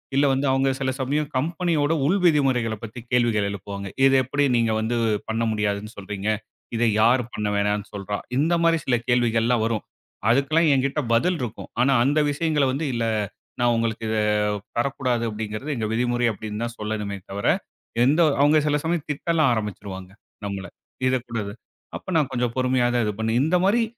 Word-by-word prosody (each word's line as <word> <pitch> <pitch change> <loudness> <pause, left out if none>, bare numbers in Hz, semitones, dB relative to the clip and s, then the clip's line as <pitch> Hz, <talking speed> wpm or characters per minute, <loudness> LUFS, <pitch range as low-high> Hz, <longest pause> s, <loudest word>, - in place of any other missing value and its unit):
இல்ல 140 +1 +4
வந்து 135 +1 0
அவங்க 135 +1 +2
சில 135 -1 0
சமயம் 145 +3 -1
கம்பெனியோட 165 0 0
உள் 190 +7 +2
விதிமுறைகளைப் 130 -9 +2
பத்தி 115 +2 -7
கேள்விகள் 115 -5 +2
எழுப்புவாங்க. 100 0 -6 0.2
இதை 135 0 +5
எப்டி 145 +3 0
நீங்க 115 -1 +2
வந்து 110 +2 -1 0.3
பண்ண 115 +1 0
முடியாதுன்னு 105 0 -2
சொல்றீங்க? 100 +1 -4 0.5
இதை 115 +1 +2
யாரு 125 +3 +4
பண்ண 105 0 -2
வேணாம்னு 105 0 0
சொல்றா? 100 0 -3 0.2
இந்த 160 +5 +2
மாரி 165 0 +4
சில 125 - +2
கேள்விகளெல்லாம் 120 -1 +2
வரும். 115 -4 -1 0.5
அதுக்கெல்லாம் 150 +6 +3
என்கிட்ட 140 +2 +1
பதில் 175 +10 +2
இருக்கும். 120 -2 -6
ஆனா 135 +2 +4
அந்த 145 +4 +2
விஷயங்களை 150 -1 +1
வந்து, 140 +5 -2
"இல்ல, 115 -1 -1 0.6
நான் 120 0 +4
உங்களுக்கு 115 -1 -1
இதைத் 105 -1 +1 0.2
தரக் 135 +3 0
கூடாது 125 -3 0
அப்டிங்கிறது 110 +7 -4
எங்க 110 -3 -2
விதிமுறை" 120 +1 +1
அப்டின்னு 105 +2 -5
தான் 120 0 -6
சொல்லணுமே 105 -2 -3
தவர, 100 +1 -2 0.6
எந்த 150 +6 +3 0.2
அவங்க 150 +2 +5
சில 150 0 +2
சமயம் 165 -1 -1
திட்ட 165 +3 -1
ஆரம்பிச்சிருவாங்க 95 -4 -4 0.3
நம்மளை. 100 -1 -5 0.4
இது 130 0 +3
கூடாது 105 -4 -3 0.4
அப்ப 185 - -7
நான் 150 -4 +1
கொஞ்சம் 120 -2 -1
பொறுமையா 130 -1 +2
தான் 120 -2 +2
இது 105 - -1
பண்ணி 110 0 0
இந்த 165 +4 +3
மாரி 225 +4 +3
120 Hz, 170 wpm, -24 LUFS, 105-140 Hz, 0.6 s, இதை